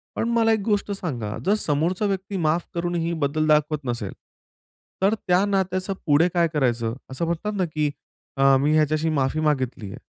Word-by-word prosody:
पण 230 - -1
मला 230 -1 +3
एक 220 - +1
गोष्ट 205 -2 0
सांगा, 125 - -4
जर 200 - +4
समोरचा 170 +7 0
व्यक्ती 195 0 -2
माफ 165 +1 +1
करूनही 170 -1 -1
बदल 155 +2 +1
दाखवत 150 -1 +2
नसेल 120 -5 -3 0.9
तर 200 +2 +4
त्या 185 -2 +1
नात्याचं 190 -1 0
पुढे 150 +3 +4
काय 170 -1 +3
करायचं? 120 -5 0 0.2
असं 130 +6 -2
म्हणतात 170 +6 -2
ना, 185 - +1
की 155 -2 -1 0.5
अ, 135 0 +5
मी 145 +3 +2
ह्याच्याशी 155 +1 +2
माफी 140 -1 0
मागितली 130 -8 -1
आहे. 115 - -8
160 Hz, 170 wpm, -24 LUFS, 145-185 Hz, 0.9 s, अ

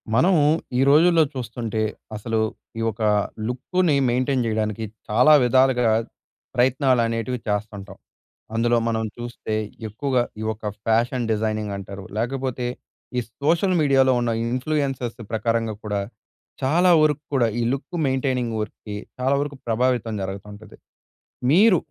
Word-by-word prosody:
మనము 175 +6 +4 0.4
ఈ - - +4
రోజుల్లో 165 +3 +6
చూస్తుంటే, 115 -3 -3 0.3
అసలు 110 +1 -2 0.4
ఈ - - -1
ఒక 110 +2 -12 0.5
లుక్కుని 150 +7 0
మెయింటైన్ 130 +1 +1
జేయడానికి 110 -1 -1 0.3
చాలా 125 +8 +6
విధాలుగా 125 -1 +4 0.6
ప్రయత్నాలనేటివి 125 -2 +1
చేస్తుంటాం. 105 -2 -4 0.6
అందులో 120 +1 +2
మనం 110 -1 0
చూస్తే 120 -2 -5 0.3
ఎక్కువగా 125 +3 0 0.2
ఈ - - -3
ఒక్క 110 0 -13 0.2
ఫ్యాషన్ 120 +2 +1
డిజైనింగ్ 110 -1 -1
అంటారు, 100 0 -8
లేకపోతే 125 +1 -2 0.5
ఈ - - +4 0.2
సోషల్ 170 +5 +2
మీడియాలో 135 -3 +4
ఉన్న 120 -1 0
ఇన్‌ఫ్లూయెన్సెస్ 130 -1 -2
ప్రకారంగా 115 0 0
కూడా, 105 -2 -1 0.6
చాలా 175 +7 +3
వరకు 150 -1 +2
కూడా 125 -3 +3
ఈ - - +1
లుక్ 145 +6 -4
మెయింటైనింగ్ 130 -3 0
వర్క్‌కి 105 0 -7 0.2
చాలా 130 +2 +2
వరకు 145 -1 -3
ప్రభావితం 120 0 +1
జరగతుంటది. 100 +2 -8 0.8
మీరు 195 +4 +6
120 Hz, 120 wpm, -23 LUFS, 110-135 Hz, 0.8 s, రోజుల్లో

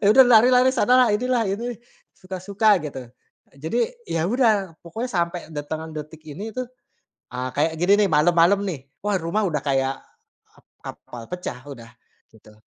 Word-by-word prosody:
Ya, - - +4
udah 265 +3 +8
lari-lari 250 +2 +6
sana 245 - +2
lah, 250 - +5
inilah, 250 +1 0
ini 230 +5 -3 0.4
suka-suka 195 +3 0
gitu. 140 -3 -6 0.6
Jadi 160 - -3 0.3
ya 165 - -2
udah, 215 -8 +1
pokoknya 225 +9 -5
sampai 175 -2 -1 0.2
datangan 155 +2 -5
detik 155 +1 -8
ini 205 +9 -7
tuh, 255 +2 -5 0.6
ah, 125 +1 -3
kayak 155 +3 +2
gini 200 +4 +4
nih - - +1
malem-malem 170 +5 +4
nih, 160 -7 -4 0.2
wah 205 -1 0
rumah 170 +6 -1
udah 155 -3 -1
kayak, 135 -1 0 0.6
ep - - -24 0.2
kapal 120 -2 -9
pecah 180 -8 -5
udah 115 -4 -12 0.4
gitu. 110 -1 -19
180 Hz, 155 wpm, -23 LUFS, 155-220 Hz, 0.6 s, udah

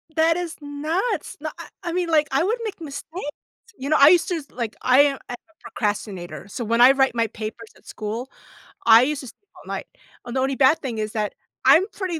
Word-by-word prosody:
That 325 +1 +3
is 345 -2 -4
nuts. 305 +10 -2
No - - -4
I - - -9 0.2
I 345 - -3
mean, 355 -2 -1
like, 305 -2 +3
I 275 +5 +2
would 445 +6 0
make 420 -5 -5
mistakes. 300 +1 -6 0.5
You 275 +2 -5
know, 310 - +4
I 280 +2 +9
used 350 -1 +4
to 335 -3 -1
like, 235 -3 -4
I 255 +2 +4
am 280 -2 +2
I - - -4
am - - -6
a 325 - -32
procrastinator, 205 -4 -4
so 235 +4 -5
when 230 +2 +1
I 255 +2 +9
write 270 -2 +2
my 230 -1 +1
papers 220 +1 -7
at - - -23
school, 225 +5 -5 0.6
I 230 +1 +8
used 290 +1 -1
to 260 - -9
sleep - - -12 0.2
all - - -16
night. - - -5 0.4
And 240 +2 -6
the - - +1
only 270 0 0
bad 285 +4 +4
thing 245 -7 -5
is 215 0 -3
that 210 -2 -2 0.3
I'm 370 +4 +7
pretty 365 -5 -3
275 Hz, 230 wpm, -23 LUFS, 230-320 Hz, 0.6 s, I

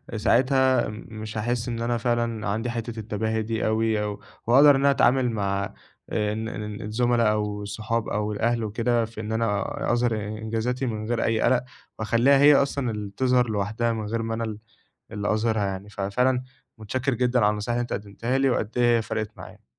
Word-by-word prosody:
ساعتها 130 +5 +3
مش 110 0 -8
هاحس 120 +2 -1
إن 115 -1 -3
أنا 120 0 0
فعلًا 115 -2 -1
عندي 110 +4 -1
حتّة 115 -1 -4
التباهي 110 +1 -2
دي 110 0 -1
أوي، 110 -1 +1
أو 105 -1 -4 0.3
وأقدر 140 +5 +7
إن - - +1
أنا 140 0 +5
أتعامل 125 -2 +3
مع 100 -2 -2 0.4
ال 110 +1 -1
ال 105 -1 -6
الزملا 115 +1 +2
أو 105 -1 -2
الصحاب 110 +2 -2
أو 105 0 -1
الأهل 115 +2 0
وكده، 115 +2 0
في 110 -1 -8
إن 110 - -5
أنا 110 -3 0 0.3
أظهر 120 -1 +1
إ - - -2 0.2
إنجازاتي 115 +4 -2
من 110 -2 -3
غير 120 -1 0
أي 110 -1 +1
قَلَق 125 0 +3 0.4
واخلّيها 120 +5 +4
هي 145 +1 +7
أصلًا 140 -3 +1
اللي 105 -2 -5
تظهر 125 -2 +3
لوحدها، 110 +3 -1
من 110 -1 -4
غير 115 +2 -2
ما 115 0 -3
أنا 115 - -2
ال 110 -2 -4 0.5
اللي 105 0 -1
أظهرها 110 -1 +1
يعني، 95 +1 -5
ففعلًا 125 +6 0 0.4
متشكّر 130 +5 -1
جدًا 125 +1 +1
على 105 -2 +4
النصايح 105 +3 -2
اللي - - +1
أنت 120 - -4
قدِّمتها 115 +6 -2
لي، 135 0 +3
وقد 110 -2 -1
إيه 120 -1 +4
هي - - 0
فَرَقِت 110 -1 -3
معايا. - - -12
115 Hz, 190 wpm, -25 LUFS, 105-120 Hz, 0.5 s, وأقدر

